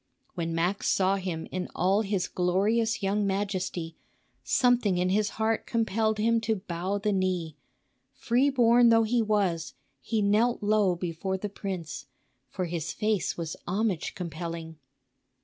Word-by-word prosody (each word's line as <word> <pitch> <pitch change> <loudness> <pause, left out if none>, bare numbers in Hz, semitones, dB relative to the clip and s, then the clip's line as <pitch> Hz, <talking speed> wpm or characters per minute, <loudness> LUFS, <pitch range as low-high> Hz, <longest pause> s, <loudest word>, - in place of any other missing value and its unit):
When 165 -1 -3
Max 180 +4 0
saw 195 +1 +2
him 180 -4 -4
in 185 0 -3
all 195 +4 +2
his 195 -3 -1
glorious 210 +6 +1
young 200 +1 +1
majesty, 190 -4 -2 0.5
something 235 - +2
in 180 +1 +1
his 210 +2 +2
heart 220 0 0
compelled 220 -1 0
him 230 +2 +2
to 220 0 0
bow 185 0 -3
the 210 +1 0
knee; 185 -5 -1 0.6
free 250 +4 +1
born 240 -2 +5
though 225 0 +5
he 235 +2 +1
was, 200 -7 0 0.2
he 215 +8 -1
knelt 215 +3 +2
low 205 -3 +3
before 175 +2 -3
the 205 +2 -4
prince, 170 -9 -6 0.4
for 185 - -3
his 170 -1 -3
face 210 -4 -1
was 165 -1 -4
homage 195 -2 -1
compelling. 165 -2 -6
195 Hz, 145 wpm, -28 LUFS, 175-220 Hz, 0.6 s, born